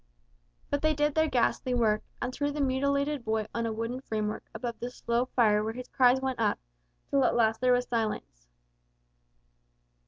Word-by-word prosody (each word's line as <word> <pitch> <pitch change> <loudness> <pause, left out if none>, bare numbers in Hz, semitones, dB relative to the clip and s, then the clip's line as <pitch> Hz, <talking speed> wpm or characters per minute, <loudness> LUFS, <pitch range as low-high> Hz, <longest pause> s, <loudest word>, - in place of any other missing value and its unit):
But 285 - 0
they 310 0 +2
did 295 0 +1
their 315 +1 +3
ghastly 250 0 +1
work, 215 -3 +2 0.2
and 250 +1 -3
threw 285 +2 -1
the 295 +1 -4
mutilated 280 +1 0
boy 220 -1 0
on 230 0 -1
a - - -2
wooden 230 +3 -3
framework 215 -4 -3
above 235 -2 -5
the 240 - -4
slow 235 0 -1
fire 215 -5 +3
where 220 +1 -3
his 250 +1 -8
cries 255 0 +4
went 265 -2 -2
up, 215 -2 +2 0.5
till 275 -1 +3
at - - +2
last 225 -1 +2
there 255 0 +4
was 245 0 +2
silence. 215 - -3
245 Hz, 180 wpm, -29 LUFS, 225-265 Hz, 0.5 s, cries